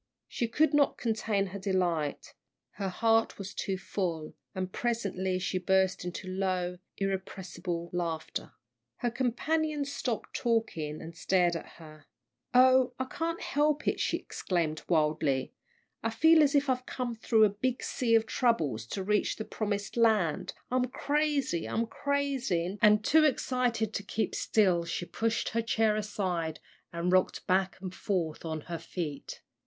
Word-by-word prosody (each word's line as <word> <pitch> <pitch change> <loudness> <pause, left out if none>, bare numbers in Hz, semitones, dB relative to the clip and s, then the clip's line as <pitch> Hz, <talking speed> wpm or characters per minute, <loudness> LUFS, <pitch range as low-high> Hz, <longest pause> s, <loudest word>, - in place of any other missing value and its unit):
She 235 - -2
could 295 +6 +2
not 290 -1 +3
contain 220 -3 0
her 200 - -4
delight. 180 -6 -1 0.4
Her 195 -1 -3
heart 225 +4 +2
was 200 0 -6
too 190 -1 -2
full, 175 -4 -3 0.2
and 185 0 -3
presently 195 -6 -1
she 185 0 -1
burst 190 0 +2
into 180 +2 -5
low, 185 -1 -1 0.2
irrepressible 185 -3 -3
laughter. 165 -3 -3 0.4
Her 240 - -1
companions 285 +4 0
stopped 245 -5 -3
talking 195 -11 -1
and 165 0 -9
stared 175 0 +2
at 165 - -7
her. 155 -2 -14 0.4
"Oh, 255 0 +5
I 260 - -1
can't 330 +5 -3
help 295 +1 +1
it!" - - +1
she - - +1
exclaimed, 165 -4 -2
wildly, 150 -4 +1 0.5
"I 225 - 0
feel 320 +8 +6
as 290 -1 +4
if 285 0 +3
I'd 255 -1 0
come 250 -2 -3
through 225 0 +3
a 215 - +6
big 245 +5 -2
sea 230 -3 +1
of 225 0 +4
troubles 155 - 0
to 190 +9 -3
reach 210 +2 +1
the 220 - -5
promised 205 -2 -3
land! 215 -9 +2 0.2
I'm 255 0 +2
crazy 285 - 0
I'm 230 - 0
crazy!" 250 -9 -1
and 210 -1 +5
too 315 +1 +5
excited 250 -6 +1
to 200 - -2
keep 215 +2 -2
still 185 -6 +2
she 170 +1 -3
pushed 225 +6 -1
her 230 - 0
chair 225 -1 +2
aside, 185 -7 -2 0.3
and 170 +1 -1
rocked 185 0 +2
back 190 0 +1
and 185 -1 -5
forth 175 -6 -2
on 160 -2 -3
her 170 +1 -5
feet. 160 -3 -6
200 Hz, 150 wpm, -30 LUFS, 175-240 Hz, 0.5 s, feel